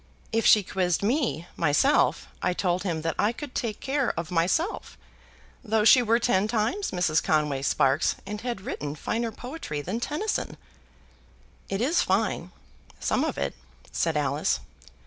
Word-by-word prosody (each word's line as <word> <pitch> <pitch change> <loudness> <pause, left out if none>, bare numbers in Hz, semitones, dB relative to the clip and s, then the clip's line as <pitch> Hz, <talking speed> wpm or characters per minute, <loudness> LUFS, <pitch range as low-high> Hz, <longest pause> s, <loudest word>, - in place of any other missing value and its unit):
If 225 0 +2
she 210 - +7
quizzed 180 -1 0
me, 230 - 0
myself, 170 - +3 0.2
I 180 - +1
told 180 0 0
him 165 -5 -2
that 165 -1 0
I 210 - +3
could 255 +2 -8
take 220 -3 -3
care 275 -1 -1
of 170 0 -5
myself, 180 - 0 0.7
though 220 -2 +1
she 250 +3 +8
were 230 0 +3
ten 210 -4 +2
times 235 - 0
Mrs. 175 -4 +1
Conway 150 -3 +1
Sparkes, 135 +2 +2
and 210 +2 -5
had 240 -5 -4
written 145 -5 -5
finer 230 +8 -2
poetry 245 - -6
than 185 +10 -3
Tennyson." 300 - -2 1.1
"It 195 +2 -2
is 310 +8 +2
fine; 190 -2 0 0.5
some - - +1
of - - -2
it," - - -1 0.4
said 165 -2 0
Alice. 145 +1 0
205 Hz, 150 wpm, -26 LUFS, 165-240 Hz, 1.1 s, she